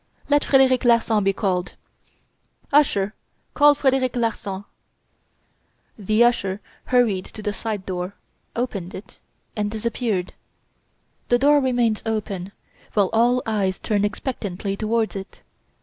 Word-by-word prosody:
"Let 290 0 +4
Frederic 265 -2 +4
Larsan 230 -3 +3
be 195 - +3
called!" 190 -3 -1 1.0
"Usher, 215 -9 +3 0.4
call 290 0 +6
Frederic 265 -2 +1
Larsan." 205 -5 -2 1.3
The 215 +2 +2
usher 200 -5 +1 0.3
hurried 230 -7 +2
to 215 - -10
the 210 - -1
side 210 -3 -4
door, 180 +1 -4 0.4
opened 200 -7 -3
it, 190 0 -11 0.4
and 210 -1 -1
disappeared. 220 -3 -2 1.0
The 245 - +5
door 290 +3 +5
remained 245 -5 +1
open, 200 -4 -3 0.4
while 200 -3 +3
all 245 +3 +3
eyes 200 -4 0
turned 205 -2 0
expectantly 200 -3 -3
towards 220 +1 -1
it. 195 0 -8
215 Hz, 120 wpm, -23 LUFS, 195-245 Hz, 1.3 s, call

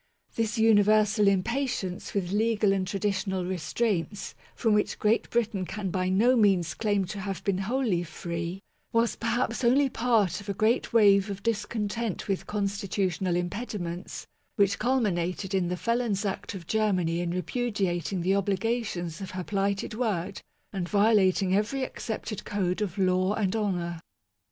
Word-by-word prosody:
This 225 -1 -1
universal 215 -1 +4
impatience 200 -2 -1
with 185 -3 -1
legal 215 -1 +2
and 190 -1 -1
traditional 190 -2 -1
restraints, 190 +3 -2 0.2
from 225 -2 +2
which 210 0 +1
Great 215 +2 +1
Britain 225 -5 0
can 190 0 -4
by 185 0 0
no 225 +7 +4
means 195 -7 +3
claim 205 -3 0
to 200 +3 -6
have 195 -1 -4
been 195 -2 0
wholly 215 -3 0
free, 170 +2 -5 0.3
was 230 0 +2
perhaps 235 +2 -1
only 265 +4 +4
part 225 -7 +1
of 200 - -10
a 200 - -1
great 220 +5 +1
wave 200 -3 +5
of 200 -1 -6
discon 220 -1 -1
tent 225 -1 -3
with 195 -2 -2
constitutional 195 -3 -1
impediments, 175 -1 -4 0.3
which 200 -1 +2
culmin 240 -8 +1
ated 180 +3 -3
in 185 -2 +1
the 180 +1 -2
felon's 230 -2 0
act 200 +2 -3
of 180 -3 -8
Germany 185 -5 +1
in 175 0 -1
repudiating 185 -1 -1
the 185 +3 +2
obligations 200 -3 -1
of 190 - -5
her 185 -1 -5
plighted 200 +2 -1
word 205 -5 -2 0.3
and 180 -3 -3
violating 200 -3 +3
every 230 +7 0
accepted 220 -4 -5
code 190 -1 -1
of 200 -2 -2
law 185 +1 +2
and 200 -2 0
honour. 175 -6 -1
200 Hz, 150 wpm, -27 LUFS, 185-220 Hz, 0.3 s, wave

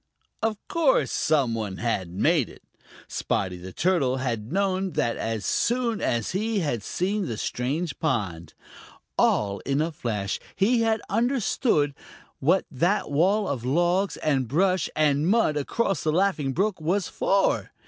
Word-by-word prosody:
Of 220 -1 0
course 320 -5 +2
some 140 -7 +2
one 105 -4 -3
had 100 -7 -1
made 130 - +2
it. - - -15 0.4
Spotty 90 -2 -2
the 90 +1 -9
Turtle 145 - +1
had 115 -3 -3
known 190 0 0
that 115 - 0
as 115 -2 -3
soon 235 -2 0
as 115 -3 0
he 210 +2 0
had 120 -9 -1
seen 190 - -1
the 115 - -4
strange 135 +7 -2
pond. 90 - -2 0.6
All 100 -1 +2
in 140 +1 -1
a 160 +2 0
flash 105 -9 -3 0.2
he 230 +4 +3
had 225 -1 +1
understood 225 - +1 0.5
what 170 +8 +2
that 170 +6 0
wall 190 +8 +2
of 130 -7 -3
logs 175 +8 +1
and 135 -5 0
brush 180 - +1
and 150 0 +2
mud 210 -6 +3
across 195 - -1
the 155 - +1
Laughing 170 -5 +1
Brook 190 +3 0
was 180 +5 0
for. 195 0 +1
155 Hz, 150 wpm, -25 LUFS, 125-195 Hz, 0.6 s, he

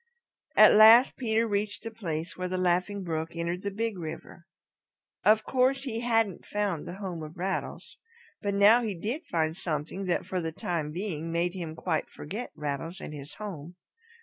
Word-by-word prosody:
At - - +8
last 225 +4 +8
Peter 230 -2 +1
reached 205 0 -2
the 225 - -5
place 170 -7 -4
where 185 0 -3
the 185 0 -2
Laughing 185 +2 +1
Brook 160 -1 -3
entered 170 +2 -2
the 200 - -2
Big 215 -1 -3
River. 170 +1 -8 0.8
Of 215 +1 +5
course 265 +2 +2
he 235 -5 -3
hadn't 225 -5 +1
found 205 -6 -2
the 175 - -6
home 185 -4 -5
of 155 +3 -9
Rattles. 190 +2 -4 0.4
But 200 -1 -1
now 210 +4 +7
he 215 -4 -2
did 235 - -4
find 160 - 0
something 170 +2 -4
that 175 -2 0
for 185 -1 -2
the 165 -1 -3
time 160 -2 -3
being 165 -2 -4
made 170 +1 0
him 170 -4 -5
quite 160 -1 -2
forget 210 +11 -6
Rattles 150 +5 -4
and - - -7
his 145 0 -8
home. 180 -6 -7
185 Hz, 175 wpm, -28 LUFS, 165-215 Hz, 0.8 s, At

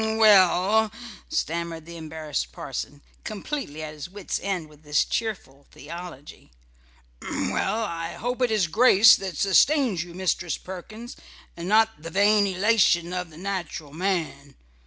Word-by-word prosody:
"H - - -1
m! - - 0
h - - 0
m! - - -3
Well," 210 0 +5 0.4
stammered 170 - -3
the 170 0 -10
embarrassed 160 -2 -4
parson, 145 +1 -6 0.2
completely 210 - -5
at 155 -1 -6
his 150 +1 -8
wit's 195 0 -4
end 185 -5 -3
with 150 -1 -19
this 150 -1 +1
cheerful 185 -12 -4
theology, 160 -1 -10 0.7
"well, 225 +1 -1
I 165 -4 -4
hope 245 +3 -4
it 250 - +3
is 215 -4 +2
grace 220 +3 +7
that 190 -5 -6
sustains 220 - +3
you, 175 -1 -12
Mistress 180 -2 -1
Perkins, 215 +6 -9 0.4
and 170 +1 -6
not 220 -4 +3
the 165 - -7
vain 205 +3 +3
elation 185 -3 +2
of 180 -1 -3
the 155 - -15
natural 175 -6 -5
man. 160 -6 -3
180 Hz, 155 wpm, -25 LUFS, 160-215 Hz, 0.7 s, grace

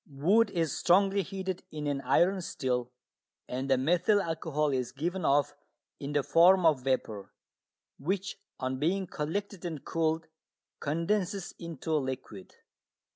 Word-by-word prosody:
Wood 190 +11 +3
is 165 -5 -1
strongly 195 +2 +3
heated 190 -1 -4
in 150 -1 -5
an 140 -1 -1
iron 185 +6 +3
still, 125 -7 -2 0.6
and 130 +2 -3
the 135 - +4
methyl 175 +9 +3
alcohol 160 -4 -1
is 130 -2 -1
given 175 +6 -3
off 140 -1 +3 0.5
in 140 +1 -5
the 145 -1 +2
form 175 +4 +5
of 150 -5 +4
vapour, 120 -6 -2 0.7
which 190 +7 -2 0.2
on 130 0 -2
being 185 +6 +1
collected 185 +5 -4
and 160 -5 -5
cooled 160 0 0 0.5
condenses 180 +5 -1
into 165 -1 -4
liquid. 130 -9 -4
160 Hz, 130 wpm, -30 LUFS, 140-185 Hz, 0.7 s, form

